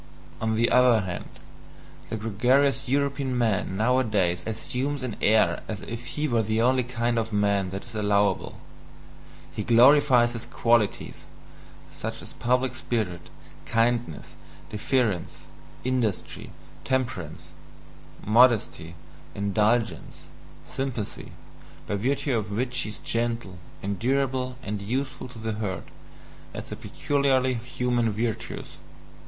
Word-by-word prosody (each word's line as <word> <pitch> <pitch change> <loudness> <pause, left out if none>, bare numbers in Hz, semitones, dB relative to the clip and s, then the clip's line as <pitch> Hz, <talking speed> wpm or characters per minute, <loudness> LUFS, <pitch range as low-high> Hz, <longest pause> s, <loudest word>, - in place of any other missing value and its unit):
On 110 0 +1
the 115 +2 +2
other 125 -3 +5
hand, 90 -2 -5 0.8
the 110 - -2
gregarious 130 +6 +2
European 140 -1 0
man 105 -5 0
nowadays 105 -7 +2
assumes 130 +5 -3
an 125 -4 -3
air 110 +1 +3
as 105 -3 -5
if 115 +2 -7
he 150 +1 +1
were 120 -4 +2
the 110 +1 0
only 125 +2 +4
kind 120 -1 0
of 115 0 -3
man 100 -2 +1
that 95 +2 -6
is 120 - -11
allowable, 105 -2 +1 0.9
he - - -4
glorifies 125 +1 +6
his 120 0 -5
qualities, 115 -3 +1 0.7
such - - -6
as - - -10
public 125 +1 +1
spirit, 105 -9 -3 0.4
kindness, 115 -7 0 0.4
deference, 110 -3 0 0.4
industry, 125 -6 -2 0.3
temperance, 120 - -2 0.8
modesty, 110 -7 +3 0.4
indulgence, 105 +3 0 0.4
sympathy, 130 -6 -4 0.5
by - - -3
virtue 135 +6 0
of 105 -2 -2
which 125 +5 -2
he 110 - -1
is 105 - -6
gentle, 115 -6 -2 0.2
endurable, 130 +5 0
and 105 -3 -4
useful 130 +5 -3
to 125 - -12
the 110 0 -3
herd, 95 -4 -3 0.7
as - - -6
the - - -5
peculiarly 135 -2 +1
human 120 -1 0
virtues. 110 +2 -4
115 Hz, 115 wpm, -26 LUFS, 105-130 Hz, 0.9 s, glorifies